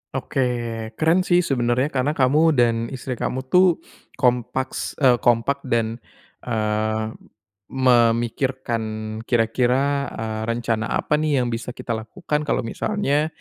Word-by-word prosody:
Oke -, -, -3 dB, 0.6 s
keren 160 Hz, +3 st, +3 dB
sih 180 Hz, -1 st, +3 dB
sebenarnya 125 Hz, 0 st, 0 dB
karena 140 Hz, +3 st, 0 dB
kamu 150 Hz, +4 st, +3 dB
dan 115 Hz, -2 st, +2 dB
istri 130 Hz, -1 st, -6 dB
kamu 130 Hz, +1 st, -2 dB
tuh 180 Hz, -2 st, +4 dB, 0.3 s
kompaks 125 Hz, 0 st, -1 dB
eee, 125 Hz, -2 st, +5 dB
kompak 120 Hz, +4 st, +2 dB
dan, 115 Hz, -1 st, 0 dB, 0.5 s
eee, 110 Hz, -1 st, -1 dB, 0.6 s
memikirkan 120 Hz, -1 st, +1 dB, 0.4 s
kira-kira, 125 Hz, +4 st, +1 dB
eee, 110 Hz, -2 st, -4 dB
rencana 115 Hz, -1 st, -1 dB
apa 150 Hz, -, 0 dB
nih 150 Hz, -4 st, +1 dB
yang 120 Hz, -, -2 dB
bisa 120 Hz, +2 st, -5 dB
kita 115 Hz, -, -6 dB
lakukan 150 Hz, +7 st, -3 dB
kalau 130 Hz, -, 0 dB
misalnya 150 Hz, -, 0 dB
125 Hz, 120 wpm, -22 LUFS, 115-140 Hz, 0.6 s, eee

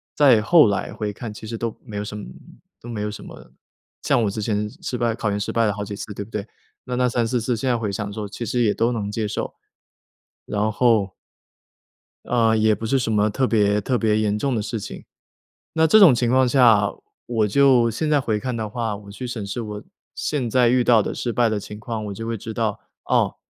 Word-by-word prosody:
在 130 Hz, -7 st, +5 dB
后 160 Hz, -3 st, +6 dB
来 100 Hz, -, -2 dB
回 105 Hz, -1 st, -3 dB
看 110 Hz, +1 st, -7 dB
其 110 Hz, +1 st, -10 dB
实 115 Hz, 0 st, -5 dB
都 115 Hz, -1 st, -3 dB
没 105 Hz, -5 st, -8 dB
有 105 Hz, -, -2 dB
什 105 Hz, 0 st, -7 dB
么 105 Hz, -, -6 dB, 0.6 s
都 120 Hz, -, -12 dB
没 115 Hz, -3 st, -4 dB
有 105 Hz, -, -2 dB
什 105 Hz, -, -8 dB
么。 -, -, -13 dB, 0.5 s
像 120 Hz, -, +2 dB
我 105 Hz, -, +1 dB
之 105 Hz, +2 st, -4 dB
前 105 Hz, -1 st, -1 dB
失 130 Hz, -, -3 dB
败 115 Hz, -1 st, 0 dB
考 110 Hz, -3 st, -2 dB
研 100 Hz, -, -1 dB
失 100 Hz, -, -3 dB
败 115 Hz, 0 st, +2 dB
了 105 Hz, -, +1 dB
好 105 Hz, -1 st, -5 dB
几 100 Hz, 0 st, -6 dB
次， 105 Hz, -, -7 dB
对 100 Hz, -, -5 dB
不 110 Hz, -, -19 dB
对？ 105 Hz, 0 st, -4 dB, 0.4 s
那 125 Hz, -1 st, -4 dB
那 125 Hz, 0 st, +2 dB
3、 120 Hz, 0 st, 0 dB
4 120 Hz, +1 st, 0 dB
次 120 Hz, +1 st, 0 dB
现 130 Hz, +4 st, -3 dB
在 120 Hz, -, +2 dB
回 110 Hz, -3 st, -2 dB
想 100 Hz, +1 st, -4 dB
说 105 Hz, -1 st, -5 dB
其 120 Hz, -, -6 dB
实 120 Hz, +3 st, 0 dB
也 105 Hz, -3 st, +3 dB
都 115 Hz, +2 st, +1 dB
能 105 Hz, -4 st, -3 dB
接 110 Hz, 0 st, -2 dB
受。 105 Hz, -, -4 dB, 0.9 s
然 105 Hz, +1 st, 0 dB
后 110 Hz, -5 st, +2 dB, 1.1 s
嗯， 115 Hz, -2 st, +2 dB
也 110 Hz, 0 st, +3 dB
不 110 Hz, -, -6 dB
是 135 Hz, +4 st, +2 dB
什 115 Hz, -2 st, -1 dB
么 105 Hz, 0 st, +2 dB
特 130 Hz, +5 st, 0 dB
别 105 Hz, -2 st, +2 dB
特 125 Hz, +4 st, 0 dB
别 110 Hz, -2 st, +2 dB
严 105 Hz, -1 st, 0 dB
重 135 Hz, +2 st, -1 dB
的 110 Hz, -, 0 dB
事 110 Hz, +1 st, -4 dB
情。 -, -, -8 dB, 0.7 s
那 160 Hz, 0 st, +3 dB
这 215 Hz, +7 st, +6 dB
种 180 Hz, -9 st, +8 dB
情 120 Hz, -1 st, +1 dB
况 130 Hz, 0 st, +4 dB
下， 115 Hz, -6 st, +5 dB, 0.4 s
我 110 Hz, -3 st, +1 dB
就 125 Hz, 0 st, +4 dB
现 150 Hz, +7 st, -2 dB
在 145 Hz, -2 st, +4 dB
回 110 Hz, -4 st, -1 dB
看 125 Hz, +1 st, -3 dB
的 110 Hz, -2 st, -3 dB
话， 115 Hz, -2 st, -2 dB
我 100 Hz, 0 st, -11 dB
去 125 Hz, +5 st, -7 dB
审 120 Hz, -4 st, -5 dB
视 100 Hz, +5 st, -4 dB
我 105 Hz, -1 st, -6 dB, 0.3 s
现 140 Hz, -5 st, -2 dB
在 125 Hz, 0 st, +4 dB
遇 125 Hz, 0 st, +3 dB
到 115 Hz, -3 st, +5 dB
的 -, -, -3 dB
失 120 Hz, -2 st, -3 dB
败 120 Hz, -2 st, +3 dB
的 105 Hz, -1 st, -1 dB
情 105 Hz, +1 st, -9 dB
况， 110 Hz, -1 st, -5 dB
我 100 Hz, -, -5 dB
就 115 Hz, +3 st, -6 dB
会 115 Hz, -1 st, -2 dB
知 110 Hz, +3 st, -7 dB
道。 110 Hz, -2 st, -1 dB, 0.3 s
哦， -, -, +1 dB
110 Hz, 260 characters per minute, -22 LUFS, 105-120 Hz, 1.1 s, 种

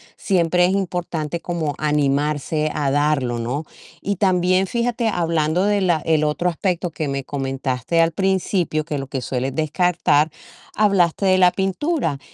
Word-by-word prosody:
siempre 180 Hz, -2 st, +1 dB
es 185 Hz, -, +1 dB
importante 170 Hz, -4 st, -3 dB
como 160 Hz, -4 st, -2 dB
animarse 150 Hz, +1 st, 0 dB
a 145 Hz, -3 st, 0 dB
darlo, 135 Hz, -5 st, +1 dB
¿no? 135 Hz, +7 st, -3 dB, 0.3 s
Y 200 Hz, 0 st, -2 dB
también 185 Hz, -1 st, +2 dB
fíjate, 235 Hz, 0 st, 0 dB
hablando 165 Hz, 0 st, 0 dB
de 205 Hz, -1 st, +2 dB
la 175 Hz, -3 st, +2 dB
el 155 Hz, -1 st, +2 dB
otro 155 Hz, +4 st, 0 dB
aspecto 175 Hz, 0 st, -2 dB
que 155 Hz, -1 st, -3 dB
me 140 Hz, -1 st, -3 dB
comentaste 135 Hz, +2 st, -2 dB
al 165 Hz, 0 st, +4 dB
principio, 185 Hz, -3 st, 0 dB
que 150 Hz, -3 st, -3 dB
lo 135 Hz, -, -6 dB
que 135 Hz, -1 st, -4 dB
sueles 130 Hz, +2 st, -3 dB
descartar, 155 Hz, -1 st, +2 dB, 0.5 s
hablaste 195 Hz, -3 st, +2 dB
de 185 Hz, -1 st, +4 dB
la 180 Hz, -1 st, +6 dB
pintura 195 Hz, -, -1 dB
165 Hz, 150 wpm, -21 LUFS, 145-185 Hz, 0.5 s, la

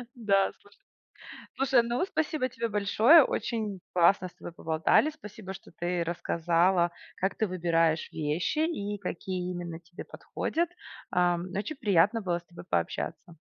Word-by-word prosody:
Да, 200 Hz, -4 st, +2 dB
слушай. 205 Hz, -, -22 dB, 0.8 s
Слушай, 265 Hz, -3 st, +4 dB
ну 240 Hz, +9 st, 0 dB
спасибо 310 Hz, -7 st, -1 dB
тебе 230 Hz, 0 st, -3 dB
большое. 220 Hz, +9 st, +6 dB
Очень 215 Hz, -7 st, -2 dB
классно 185 Hz, +1 st, +4 dB
с -, -, -15 dB
тобой -, -, -9 dB
поболтали. 160 Hz, -, +2 dB
Спасибо, 210 Hz, -9 st, -9 dB
что -, -, -13 dB
ты 175 Hz, 0 st, -2 dB
рассказала, 170 Hz, +1 st, +1 dB, 0.2 s
как 190 Hz, +1 st, -1 dB
ты 220 Hz, -, 0 dB
выбираешь 165 Hz, -3 st, +1 dB
вещи 155 Hz, -, -1 dB
и 210 Hz, -11 st, -1 dB
какие 180 Hz, -1 st, -4 dB
именно 170 Hz, -2 st, -5 dB
тебе 175 Hz, +1 st, -10 dB
подходят. 340 Hz, +1 st, -3 dB, 0.4 s
Ам, 175 Hz, 0 st, +2 dB
очень 250 Hz, +10 st, -3 dB
приятно 210 Hz, -1 st, +3 dB
было 175 Hz, -3 st, -1 dB
с -, -, -23 dB
тобой 170 Hz, -, -12 dB
пообщаться. 90 Hz, -, -2 dB
190 Hz, 145 wpm, -29 LUFS, 170-225 Hz, 0.8 s, большое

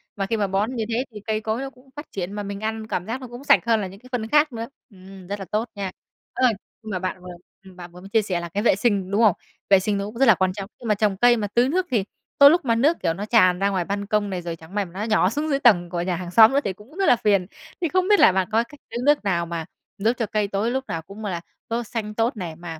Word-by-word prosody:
Mà 195 Hz, -, -2 dB
khi 225 Hz, +3 st, -1 dB
mà 205 Hz, -, 0 dB
bón 200 Hz, +6 st, -1 dB
như 225 Hz, -, -1 dB
thế 240 Hz, +4 st, -1 dB
thì 210 Hz, -, -9 dB
cây 215 Hz, 0 st, 0 dB
cối 220 Hz, +3 st, -2 dB
nó 270 Hz, -, -4 dB
cũng 260 Hz, +1 st, -23 dB
phát 295 Hz, -, -9 dB
triển 190 Hz, 0 st, -4 dB
mà 205 Hz, 0 st, -4 dB
mình 200 Hz, 0 st, -5 dB
ăn 220 Hz, 0 st, -3 dB
cảm 180 Hz, -, -3 dB
giác 245 Hz, +4 st, -4 dB
nó 255 Hz, -, -7 dB
cũng 240 Hz, +3 st, -10 dB
sạch -, -, +6 dB
hơn 225 Hz, -2 st, +2 dB
là 190 Hz, -, -3 dB
những 195 Hz, +2 st, -12 dB
cái 255 Hz, +1 st, -17 dB
phân 225 Hz, -3 st, -2 dB
khác 295 Hz, 0 st, +3 dB
nữa. 230 Hz, 0 st, -5 dB, 0.2 s
Ừm, 190 Hz, -2 st, -14 dB
rất 205 Hz, +1 st, -4 dB
là 195 Hz, -, -6 dB
tốt 220 Hz, +3 st, -1 dB
nha. 195 Hz, -2 st, -4 dB, 0.4 s
Ơ, 260 Hz, -, -2 dB, 0.4 s
nhưng 215 Hz, -, -7 dB
mà 185 Hz, -, -2 dB
bạn 185 Hz, 0 st, -4 dB
vừa 180 Hz, 0 st, -9 dB, 0.4 s
bạn 175 Hz, -1 st, -10 dB
vừa 180 Hz, -, -13 dB
mới 195 Hz, -, -11 dB
chia 220 Hz, +1 st, +3 dB
sẻ 185 Hz, -4 st, -2 dB
là 170 Hz, 0 st, -6 dB
cái 205 Hz, +5 st, -2 dB
vệ 235 Hz, -, +4 dB
sinh, 200 Hz, -3 st, 0 dB
đúng 210 Hz, +3 st, +2 dB
không? 205 Hz, -5 st, +5 dB, 0.3 s
Vệ 195 Hz, -1 st, +7 dB
sinh 205 Hz, +1 st, -1 dB
nó 200 Hz, -, -2 dB
cũng 215 Hz, +3 st, -8 dB
rất 270 Hz, -, +4 dB
là 225 Hz, -, +7 dB
quan 185 Hz, 0 st, 0 dB
trọng, 195 Hz, 0 st, -7 dB
nhưng 240 Hz, -, -8 dB
mà 210 Hz, -, +3 dB
trồng 205 Hz, -2 st, 0 dB
cây 240 Hz, +2 st, +5 dB
mà 210 Hz, -, -2 dB
tưới 240 Hz, +5 st, +2 dB
nước 365 Hz, +5 st, +1 dB
thì 225 Hz, -6 st, +2 dB, 0.3 s
tới 280 Hz, 0 st, +9 dB
lúc 335 Hz, -2 st, +2 dB
mà 230 Hz, -, +2 dB
nước, 290 Hz, +9 st, +3 dB
kiểu, 165 Hz, -3 st, +1 dB
nó 195 Hz, +5 st, -5 dB
tràn 185 Hz, -5 st, +4 dB
ra 200 Hz, -, +2 dB
ngoài 185 Hz, -3 st, -1 dB
ban 200 Hz, +2 st, -3 dB
công 210 Hz, -1 st, 0 dB
này 185 Hz, -2 st, -3 dB
rồi 170 Hz, -1 st, -5 dB
chẳng 165 Hz, +4 st, -14 dB
may 205 Hz, -1 st, 0 dB
nó 185 Hz, +4 st, -6 dB
nhỏ 215 Hz, -4 st, +2 dB
xuống 295 Hz, +6 st, -2 dB
dưới 275 Hz, -1 st, +1 dB
tầng 175 Hz, -9 st, +4 dB
của 170 Hz, -1 st, -2 dB
nhà 180 Hz, 0 st, -1 dB
hàng 175 Hz, 0 st, -6 dB
xóm 225 Hz, +5 st, +7 dB
nữa 280 Hz, -, +4 dB
thì 195 Hz, -, -2 dB
cũng 220 Hz, -, -17 dB
rất 390 Hz, -, +1 dB
là -, -, +6 dB
phiền. 200 Hz, -5 st, +2 dB, 0.4 s
Thì 340 Hz, -, +1 dB
không 370 Hz, +2 st, +1 dB
biết 415 Hz, 0 st, +5 dB
là -, -, +7 dB
bạn 190 Hz, -1 st, 0 dB
có 225 Hz, +2 st, +3 dB
cách 285 Hz, +4 st, -16 dB
tưới -, -, -5 dB
nước 295 Hz, -5 st, +4 dB
nào 175 Hz, -4 st, 0 dB
mà 165 Hz, -1 st, -5 dB, 0.3 s
giúp 220 Hz, +4 st, +2 dB
cho 230 Hz, -, 0 dB
cây 210 Hz, -1 st, -1 dB
cối 205 Hz, +4 st, -1 dB
lúc 265 Hz, +1 st, -1 dB
nào 165 Hz, -, -3 dB
cũng 200 Hz, +6 st, -10 dB
là 175 Hz, -4 st, -3 dB, 0.3 s
tốt 235 Hz, +1 st, -2 dB
xanh 215 Hz, -1 st, -5 dB
tốt 230 Hz, +2 st, 0 dB
này 170 Hz, -4 st, -5 dB
mà, 165 Hz, -2 st, -8 dB
210 Hz, 315 wpm, -23 LUFS, 190-235 Hz, 0.4 s, tới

